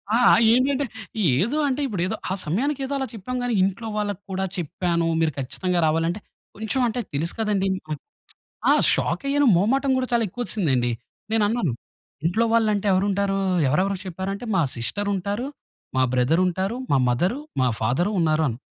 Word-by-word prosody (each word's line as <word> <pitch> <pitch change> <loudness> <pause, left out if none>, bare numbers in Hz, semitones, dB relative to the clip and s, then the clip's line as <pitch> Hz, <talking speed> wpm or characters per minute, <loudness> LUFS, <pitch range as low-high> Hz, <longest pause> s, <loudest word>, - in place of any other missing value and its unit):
ఆ! - - +5 0.3
ఏంటంటే 270 +3 +2 0.5
ఏదో 235 +10 0
అంటే 275 +2 -1
ఇప్పుడు 200 -7 -3
ఏదో - - -2 0.2
ఆ - - +2
సమయానికి 270 - -1
ఏదో 280 - -4
అలా 265 -1 -2
చెప్పాం 235 +5 -5
గానీ 245 -1 0
ఇంట్లో 200 +4 -2
వాళ్ళకి 205 -2 -2
కూడా 190 +1 -1
చెప్పాను, 170 0 -1
మీరు 160 -1 +2
ఖచ్చితంగా 180 +7 -1
రావాలంటే 165 +5 0 0.4
కొంచెం 220 +5 0
అంటే 235 +2 -2
తెలుసు 160 +4 -1
కదండీ. 205 -3 +1 1.0
ఆ! - - +7 0.2
షాక్ - - -1
అయ్యాను. 285 0 +3
మొహమాటం 265 +9 +2
గూడా 255 -1 -1
చాలా 235 -1 +3
ఎక్కువ 245 +6 -5
ఒస్సింది 175 -11 0
అండి. 120 0 +1 0.4
నేను 220 -2 +3
అన్నాను 220 - 0 0.5
ఇంట్లో 220 +7 +2
వాళ్ళు 225 -2 +3
అంటే 205 +1 -2
ఎవరుంటారు 195 +1 +1 0.3
ఎవరెవరికి 185 +6 0
చెప్పారు? 190 +2 -4
అంటే 200 - -7
మా 170 - +4
సిస్టర్ 205 - -1
ఉంటారు. 200 +7 -2 0.5
మా 130 - +4
బ్రదర్ 130 +8 +3
ఉంటారు. 190 +6 -1 0.2
మా 135 - +5
మదర్ 175 - +1 0.3
మా 125 - +3
ఫాదర్ 130 - +1
ఉన్నారు 160 -1 +2
అని 115 +1 -5
195 Hz, 170 wpm, -23 LUFS, 170-230 Hz, 1.0 s, ఆ